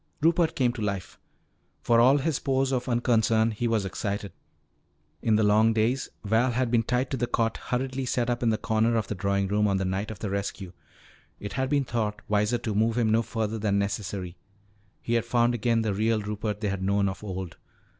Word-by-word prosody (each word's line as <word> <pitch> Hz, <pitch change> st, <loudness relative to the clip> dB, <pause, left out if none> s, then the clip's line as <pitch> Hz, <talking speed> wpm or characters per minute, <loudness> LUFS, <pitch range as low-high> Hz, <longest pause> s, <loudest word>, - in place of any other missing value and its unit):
Rupert 165 Hz, +1 st, +2 dB
came 125 Hz, -3 st, +2 dB
to 115 Hz, -, -7 dB
life. 100 Hz, -3 st, -4 dB, 0.6 s
For 115 Hz, -1 st, +4 dB
all 130 Hz, +4 st, +6 dB
his 145 Hz, 0 st, -1 dB
pose 135 Hz, 0 st, 0 dB
of 125 Hz, -1 st, -1 dB
unconcern, 115 Hz, -2 st, +2 dB
he 115 Hz, +2 st, -2 dB
was 110 Hz, -3 st, +1 dB
excited. 100 Hz, +1 st, -3 dB, 0.9 s
In 110 Hz, -, +2 dB
the 110 Hz, -, +3 dB
long 110 Hz, +2 st, +4 dB
days 115 Hz, +4 st, 0 dB, 0.2 s
Val 110 Hz, +5 st, +2 dB
had 125 Hz, -1 st, 0 dB
been 120 Hz, -2 st, +4 dB
tied 125 Hz, +3 st, -1 dB
to 135 Hz, -, -1 dB
the 120 Hz, 0 st, -1 dB
cot 115 Hz, -1 st, 0 dB
hurriedly 130 Hz, +1 st, -2 dB
set 120 Hz, -1 st, 0 dB
up 120 Hz, -1 st, -1 dB
in 115 Hz, -2 st, +2 dB
a 110 Hz, -, 0 dB
corner 110 Hz, +2 st, +1 dB
of 110 Hz, -2 st, +1 dB
the -, -, -1 dB
drawing 100 Hz, 0 st, 0 dB
room 105 Hz, +2 st, +2 dB
on 100 Hz, -1 st, +1 dB
the 95 Hz, -, -1 dB
night 95 Hz, +3 st, -2 dB
of 110 Hz, -, -6 dB
the 100 Hz, -1 st, -4 dB
rescue 100 Hz, -2 st, -4 dB, 0.7 s
it 100 Hz, -1 st, -6 dB
had 130 Hz, 0 st, -1 dB
been 140 Hz, -1 st, +1 dB
thought 110 Hz, -3 st, -2 dB
wiser 105 Hz, +3 st, +1 dB
to 110 Hz, -2 st, -3 dB
move 110 Hz, +3 st, +1 dB
him 115 Hz, -3 st, +2 dB
no 115 Hz, +1 st, +4 dB
farther 110 Hz, -1 st, -3 dB
than 100 Hz, -1 st, +1 dB
necessary 100 Hz, -2 st, -3 dB, 0.7 s
he 115 Hz, -, -2 dB
had 115 Hz, -1 st, +2 dB
found 120 Hz, +1 st, +2 dB
again 115 Hz, 0 st, +1 dB
the 105 Hz, -2 st, 0 dB
real 110 Hz, +2 st, +1 dB
Rupert 105 Hz, 0 st, -4 dB
they 105 Hz, -, 0 dB
had 95 Hz, -1 st, -3 dB
known 100 Hz, +1 st, +1 dB
of 95 Hz, +1 st, -5 dB
old. 95 Hz, -4 st, -6 dB
110 Hz, 215 wpm, -27 LUFS, 100-120 Hz, 0.9 s, all